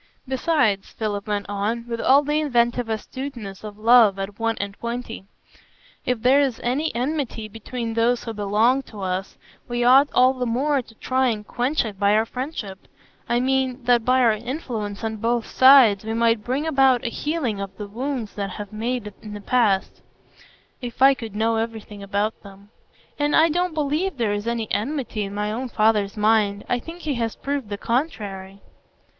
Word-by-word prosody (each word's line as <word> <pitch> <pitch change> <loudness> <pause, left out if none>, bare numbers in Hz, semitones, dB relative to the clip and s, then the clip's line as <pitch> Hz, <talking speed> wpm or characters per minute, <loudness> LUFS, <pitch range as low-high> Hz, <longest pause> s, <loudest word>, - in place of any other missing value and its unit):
Besides," 260 -7 +1
Philip 205 -2 -4
went 205 -1 -1
on, 210 +4 -2
with 230 -1 -3
all 275 +3 +5
the 295 +1 0
inventive 240 -4 +1
astuteness 225 -3 -6
of 210 -1 -8
love 220 -2 +5
at 195 +2 -6
one 225 0 0
and 200 0 -3
twenty, 235 -1 -6 0.8
"if 250 -3 -1
there 265 +3 +5
is 265 -5 0
any 275 +6 0
enmity 250 -4 -2
between 225 +2 -5
those 230 +2 +1
who 230 - -5
belong 215 +6 +2
to 215 -6 -11
us, 185 +1 -3 0.3
we 240 0 -1
ought 270 +4 +6
all 255 +1 +5
the 250 -1 -3
more 275 +4 +1
to 225 -2 -18
try 260 +3 0
and 215 -3 -2
quench 250 +5 0
it 205 -3 -7
by 200 0 +3
our 220 +1 +3
friendship; 235 -7 -6 0.4
I 240 - +2
mean, 260 0 0
that 240 -1 +3
by 255 +2 +3
our 235 -2 +5
influence 225 -3 -5
on 220 -1 -2
both 230 +2 0
sides 260 -7 +6
we 220 +1 -3
might 230 -2 +2
bring 260 +7 -1
about 270 -5 +3
a - - 0
healing 260 -7 -2
of 195 -1 -7
the 210 - -5
wounds 240 +1 -4
that 200 -1 -3
have 205 +1 -7
been 215 - -8
made 235 -3 -3
in 210 -1 -8
the - - -6
past, 205 -3 +1 0.8
if 245 +1 -2
I 275 +1 +8
could 225 -5 -8
know 225 +1 +1
everything 220 -2 -5
about 200 +2 -2
them. 200 +1 -15 0.5
And 290 0 +2
I 325 +1 +5
don't 355 +1 -1
believe 305 +3 -1
there 225 -4 0
is 205 +2 -4
any 235 -2 -1
enmity 245 -2 -2
in 195 +1 -7
my 210 0 -1
own 250 +3 -4
father's 215 -2 +1
mind; 210 -1 +2
I 245 - 0
think 330 +7 -10
he 305 -3 -2
has 225 -1 -2
proved 280 -5 -4
the 205 - -4
contrary." 200 -7 -3
230 Hz, 185 wpm, -23 LUFS, 210-260 Hz, 0.8 s, I